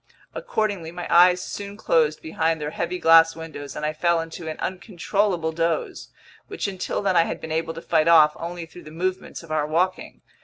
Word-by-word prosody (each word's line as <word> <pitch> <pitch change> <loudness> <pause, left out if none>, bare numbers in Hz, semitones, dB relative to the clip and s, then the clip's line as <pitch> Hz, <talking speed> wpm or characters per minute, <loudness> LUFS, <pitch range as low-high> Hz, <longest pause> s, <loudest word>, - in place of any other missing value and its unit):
Accordingly, 205 - -2
my 175 0 -6
eyes 180 +1 +6
soon 200 0 -7
closed 155 -6 +1
behind 160 -1 -1
their 150 0 -4
heavy 175 +3 -3
glass 165 -1 +6
windows 155 -4 -8
and 150 - -3
I 155 - -1
fell 170 +2 +1
into 165 0 -7
an 155 - -5
uncontrollable 185 -2 -1
doze, 165 -1 -2 0.4
which 410 - -4
until 190 +1 -3
then 190 -2 +1
I 165 -1 +5
had - - -4
been 160 - -8
able 165 +1 -2
to 165 - -8
fight 160 -1 +2
off 155 -2 +6
only 170 0 -6
through 175 +2 -14
the - - -9
movements 180 +3 -4
of 165 - -12
our 155 -1 0
walking. 180 +4 -1
165 Hz, 195 wpm, -23 LUFS, 160-180 Hz, 0.4 s, eyes